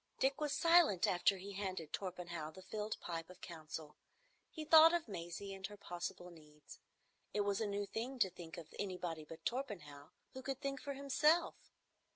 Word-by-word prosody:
Dick 275 Hz, +3 st, +1 dB
was 300 Hz, -1 st, +1 dB
silent 330 Hz, -, +5 dB
after 190 Hz, +2 st, +3 dB
he 195 Hz, +2 st, -7 dB
handed 190 Hz, -5 st, -4 dB
Torpenhow 175 Hz, -4 st, -4 dB
the 185 Hz, +4 st, -12 dB
filled 210 Hz, +2 st, -3 dB
pipe 165 Hz, -1 st, -4 dB
of 180 Hz, -, -12 dB
council. 155 Hz, -2 st, -7 dB, 0.5 s
He 310 Hz, -, -6 dB
thought 320 Hz, +2 st, +9 dB
of 340 Hz, -5 st, -1 dB
Maisie 195 Hz, +1 st, -5 dB
and 190 Hz, 0 st, -4 dB
her 205 Hz, 0 st, -11 dB
possible 175 Hz, -2 st, -5 dB
needs. 150 Hz, -3 st, -14 dB, 0.6 s
It 210 Hz, -, +3 dB
was 200 Hz, +1 st, +1 dB
a 220 Hz, -, +1 dB
new 200 Hz, 0 st, -1 dB
thing 240 Hz, +6 st, -4 dB
to 190 Hz, -6 st, +3 dB
think 170 Hz, -2 st, -9 dB
of 165 Hz, -2 st, -9 dB
anybody 180 Hz, -5 st, -3 dB
but 160 Hz, +2 st, -11 dB
Torpenhow, 175 Hz, -, -4 dB, 0.2 s
who 260 Hz, -, -6 dB
could 270 Hz, 0 st, -3 dB
think 275 Hz, -2 st, -3 dB
for 285 Hz, -1 st, -3 dB
himself. 290 Hz, +5 st, +3 dB
195 Hz, 180 wpm, -38 LUFS, 170-260 Hz, 0.6 s, thought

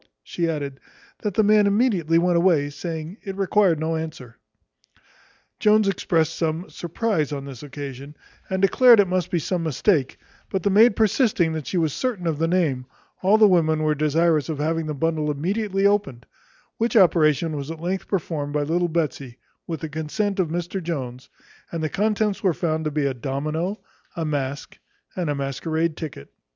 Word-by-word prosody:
She 170 Hz, -, -2 dB
added, 140 Hz, -4 st, -4 dB, 0.4 s
"That 205 Hz, -3 st, -3 dB
the 220 Hz, -, +4 dB
man 210 Hz, 0 st, +5 dB
immediately 200 Hz, -7 st, +2 dB
went 175 Hz, +1 st, +2 dB
away, 170 Hz, -5 st, +3 dB
saying, 160 Hz, +4 st, -6 dB
it 195 Hz, -1 st, -6 dB
required 195 Hz, -4 st, +2 dB
no 160 Hz, +1 st, -1 dB
answer." 155 Hz, -7 st, -7 dB, 1.2 s
Jones 215 Hz, -1 st, +4 dB
expressed 165 Hz, -4 st, +1 dB
some 165 Hz, +2 st, -2 dB
surprize 175 Hz, -3 st, -2 dB
on 140 Hz, -1 st, -4 dB
this 135 Hz, -4 st, -9 dB
occasion, 140 Hz, 0 st, -8 dB, 0.3 s
and 190 Hz, 0 st, -1 dB
declared 235 Hz, +4 st, +6 dB
it 200 Hz, -, +5 dB
must 180 Hz, 0 st, -1 dB
be 180 Hz, -, 0 dB
some 175 Hz, +2 st, -1 dB
mistake; 155 Hz, -1 st, +1 dB, 0.3 s
but 190 Hz, -3 st, -2 dB
the 200 Hz, -, +2 dB
maid 215 Hz, +2 st, +6 dB
persisting 210 Hz, -, +2 dB
that 155 Hz, -3 st, -5 dB
she 185 Hz, -, -2 dB
was 160 Hz, -4 st, +1 dB
certain 235 Hz, -9 st, -2 dB
of 160 Hz, -3 st, -1 dB
the 165 Hz, -, +1 dB
name, 155 Hz, -8 st, 0 dB, 0.3 s
all 195 Hz, +3 st, +4 dB
the 215 Hz, -1 st, +7 dB
women 160 Hz, -4 st, +2 dB
were 155 Hz, 0 st, +2 dB
desirous 155 Hz, +1 st, +1 dB
of 155 Hz, -, -2 dB
having 160 Hz, +2 st, -1 dB
the 150 Hz, -, -3 dB
bundle 155 Hz, +1 st, 0 dB
immediately 195 Hz, +6 st, -1 dB
opened; 200 Hz, -, +1 dB, 0.5 s
which 230 Hz, +1 st, +1 dB
operation 160 Hz, -4 st, +4 dB
was 140 Hz, 0 st, -5 dB
at 165 Hz, -1 st, -6 dB
length 185 Hz, +3 st, -3 dB
performed 155 Hz, -6 st, -2 dB
by 150 Hz, -1 st, +1 dB
little 170 Hz, +4 st, 0 dB
Betsy, 140 Hz, -6 st, -3 dB, 0.3 s
with 165 Hz, -2 st, -4 dB
the 160 Hz, -, -3 dB
consent 190 Hz, +7 st, -2 dB
of 180 Hz, -, +2 dB
Mr 175 Hz, +3 st, -3 dB
Jones: 130 Hz, -7 st, -5 dB, 0.4 s
and 165 Hz, -2 st, -3 dB
the 155 Hz, -, 0 dB
contents 210 Hz, +1 st, 0 dB
were 185 Hz, -5 st, +1 dB
found 160 Hz, -2 st, -1 dB
to -, -, +1 dB
be 150 Hz, -1 st, -1 dB
a 135 Hz, -, 0 dB
domino, 155 Hz, -, -3 dB, 0.4 s
a 165 Hz, -2 st, -2 dB
mask, 145 Hz, -2 st, -4 dB, 0.4 s
and 175 Hz, -4 st, -2 dB
a 145 Hz, -, 0 dB
masquerade 155 Hz, +4 st, -2 dB
ticket. 150 Hz, -, -8 dB
165 Hz, 180 wpm, -23 LUFS, 150-190 Hz, 1.2 s, the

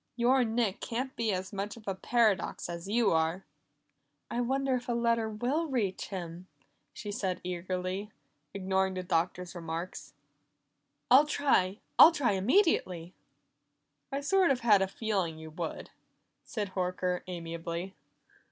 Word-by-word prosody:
Your 250 Hz, +2 st, +4 dB
Nick 225 Hz, -3 st, 0 dB
can't 255 Hz, +3 st, -3 dB
be 225 Hz, -2 st, 0 dB
as 190 Hz, +1 st, -3 dB
much 200 Hz, +3 st, -4 dB
of 215 Hz, -, -15 dB
a 195 Hz, -, 0 dB
paradox 215 Hz, -1 st, +1 dB
as 170 Hz, +1 st, -6 dB
you 230 Hz, +2 st, +3 dB
are!" 165 Hz, +3 st, +1 dB, 0.9 s
"I 240 Hz, -, 0 dB
wonder 265 Hz, +2 st, 0 dB
if 250 Hz, 0 st, -2 dB
a -, -, +2 dB
letter 230 Hz, -1 st, +1 dB
will 255 Hz, +10 st, -1 dB
reach 220 Hz, -9 st, -1 dB
him," 180 Hz, -1 st, -6 dB, 0.4 s
she 205 Hz, -, -6 dB
said 190 Hz, -3 st, -2 dB
eagerly, 185 Hz, +3 st, -3 dB, 0.4 s
ignoring 190 Hz, -1 st, 0 dB
the 185 Hz, -, -3 dB
Doctor's 180 Hz, 0 st, -1 dB
remarks. 170 Hz, +1 st, -6 dB, 1.0 s
"I'll 280 Hz, +4 st, +8 dB
try. 225 Hz, -10 st, +1 dB, 0.2 s
I'll 325 Hz, -, +11 dB
try 285 Hz, -8 st, +1 dB
immediately." 190 Hz, -, +2 dB, 1.0 s
"I 275 Hz, +1 st, -2 dB
sort 375 Hz, +4 st, +3 dB
of 260 Hz, -2 st, +1 dB
had 210 Hz, -4 st, +5 dB
a 195 Hz, -, +2 dB
feeling 195 Hz, -5 st, -2 dB
you 160 Hz, 0 st, -9 dB
would," 165 Hz, +1 st, -5 dB, 0.5 s
said 205 Hz, -4 st, -4 dB
Horker 180 Hz, -1 st, -1 dB
amiably. 170 Hz, +1 st, -5 dB
195 Hz, 140 wpm, -30 LUFS, 180-240 Hz, 1.0 s, I'll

